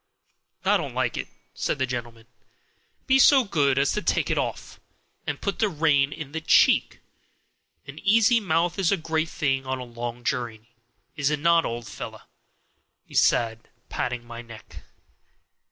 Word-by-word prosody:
"I - - +4
don't - - -6
like - - 0
it," - - -4 0.3
said - - -2
the 130 - +1
gentleman; 120 -3 -6 0.8
"be 265 0 +4
so 270 0 +7
good 145 - +1
as 140 +1 +2
to 210 - -1
take - - 0
it - - 0
off, - - -5 0.5
and - - -3
put 200 - -3
the 215 - +2
rein 145 -4 +2
in 145 -1 -7
at - - -21
the 160 - -3
cheek. 160 - +3 0.8
An 140 +3 -10
easy 225 +3 +4
mouth 175 -2 0
is 185 -2 +2
a 200 - +2
great 160 0 -1
thing 135 -2 -1
on 130 0 -1
a 130 - -6
long 120 0 -6
journey, 120 -4 -4 0.4
is 145 -1 +1
it 150 - 0
not, 170 +1 +3
old 120 0 -5
fellow?" 100 - -8 0.8
he - - -18
said, 115 -1 +2 0.2
patting 120 -1 -3
my 120 0 -8
neck. 115 -2 -13
140 Hz, 170 wpm, -25 LUFS, 120-165 Hz, 0.8 s, so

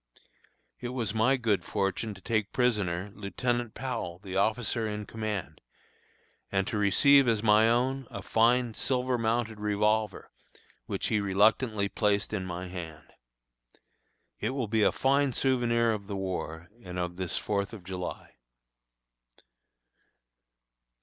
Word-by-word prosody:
It 120 - -4
was 120 -5 -2
my 125 +5 +3
good 110 -5 +1
fortune 100 +1 -2
to 95 - -14
take 110 -2 -1
prisoner 105 -6 0
Lieutenant 120 +4 -2
Powell, 90 -10 -4
the 95 0 -8
officer 110 +3 +1
in 105 0 -4
command, 110 -4 -4 0.9
and 95 0 +1
to 105 - -2
receive 135 +7 +5
as 115 -2 +1
my 110 +1 +5
own 130 +2 +1
a 100 -5 -7
fine 120 +2 +3
silver 125 +1 0
mounted 115 -1 -1
revolver, 105 +1 0 0.6
which - - -2
he 110 - +2
reluctantly 105 +2 +2
placed 105 0 0
in 95 -3 -2
my 90 +1 -5
hand. 80 -5 -8 1.3
It 115 +5 -2
will 130 -5 -1
be 110 +1 +1
a - - +5
fine 140 0 +2
souvenir 120 -3 +2
of 100 -3 -4
the 100 - -4
war 85 -3 -4
and 90 -1 -7
of 90 0 -3
this 95 -2 -2
Fourth 100 -1 -1
of 110 -5 -10
July. 90 -8 -6
105 Hz, 135 wpm, -29 LUFS, 95-120 Hz, 1.3 s, receive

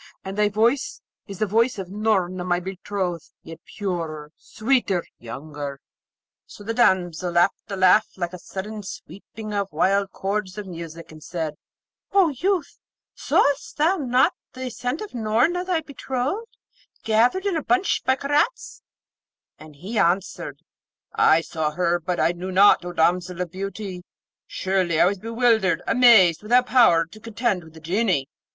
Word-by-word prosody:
And 190 0 -5
thy 210 0 +2
voice 230 +6 +1 0.3
is 200 -2 -8
the 215 - +1
voice 230 +4 +1
of 190 -2 -6
Noorna, 190 -4 0
my 175 -1 0
betrothed; 185 -2 -4
yet 165 0 -10 0.2
purer, 165 -7 -4
sweeter, 215 -6 0 0.2
younger.' 140 +3 -7 0.7
So - - -12
the 225 +2 -3
damsel 180 -6 +1
laughed 175 +3 +4 0.2
a 200 - -3
laugh 185 +3 +5
like 175 -1 -3
a 180 - -7
sudden 210 +4 -6
sweeping 210 +2 -9
of 200 -2 -2
wild 195 +5 +1
chords 195 0 -3
of 210 - -5
music, 165 -2 -9
and 155 -1 -13
said, 160 -4 -4 0.6
'O 390 -4 +5
youth, 350 +4 -2 0.3
saw'st 280 -1 +1
thou 330 +6 +3
not 255 -4 +2 0.2
the 260 0 -6
ascent 250 - -4
of 425 - -7
Noorna, 240 +10 +1
thy 360 -3 0
betrothed, 285 - -4 0.5
gathered 240 - +2
in 395 -3 0
a 320 - 0
bunch 370 +4 +1
by 260 - +3
Karaz?' 290 - -1 0.8
And 155 -1 -13
he 200 +9 -4
answered, 175 -5 -1 0.5
'I 160 - +4
saw 160 -2 -2
her; 175 +1 +1
but 175 +1 -3
I - - +3
knew 180 +2 -6
not, 195 0 +5
O 175 - -5
damsel 175 +1 +1
of 180 -2 -3
beauty; 195 0 -6 0.5
surely 185 -4 0
I - - +6
was 195 +1 0
bewildered, 225 -4 +1
amazed, 220 -9 +6
without 245 +4 +3
power 200 -11 +5
to 190 +7 -15
contend 230 -4 -2
with 160 0 -16
the - - -11
Genie.' 175 -4 0
195 Hz, 155 wpm, -23 LUFS, 175-235 Hz, 0.8 s, I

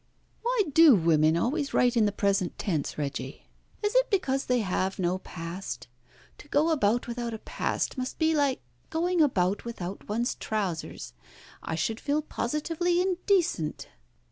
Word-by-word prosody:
Why 475 -2 +2
do 320 -4 +8
women 160 -2 +3
always 280 - -1
write 245 0 +3
in 225 -2 +4
the - - 0
present 200 -3 0
tense, 160 -8 -2
Reggie? 140 -2 -4 0.4
Is 415 - +1
it - - +3
because 275 -9 0
they 250 -1 +2
have 190 -1 -1
no 185 0 0
past? 165 -7 -7 0.5
To - - -13
go 300 +3 +2
about 240 -6 +2
without 235 -1 -3
a - - -5
past, 255 - -2
must 255 0 -4
be 320 0 +2
like 285 -4 +1 0.3
going 345 +1 +1
about 200 -9 +2
without 200 -6 -6
one's 235 +4 0
trousers. 195 -7 -4 0.5
I 160 - -3
should 220 +8 -1
feel 295 +2 0
positively 330 +7 -1
indecent." 360 - 0
235 Hz, 150 wpm, -28 LUFS, -, 0.5 s, do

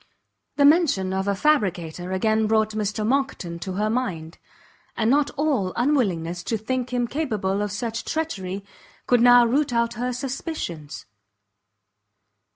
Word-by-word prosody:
The 285 - +4
mention 285 - +3
of 190 +1 -1
a 200 - +1
fabricator 185 - 0
again 220 +3 +1
brought 220 0 +2
Mr 215 0 -2
Monckton 245 -9 -1
to 185 +2 -5
her 210 +3 0
mind, 185 -9 -3 0.6
and 225 +1 +2
not 285 +1 +3
all 280 -10 +1
her 185 - -6
unwillingness 190 - 0
to 225 - -1
think 250 +3 -3
him 245 -1 0
capable 215 -9 -1
of 205 -1 -2
such 230 +3 -3
treachery, 200 - -3 0.4
could 245 -1 +3
now 245 0 +7
root 275 +4 +1
out 235 0 +1
her 245 +2 -2
suspicions. 250 - -5
220 Hz, 145 wpm, -24 LUFS, 190-255 Hz, 0.6 s, now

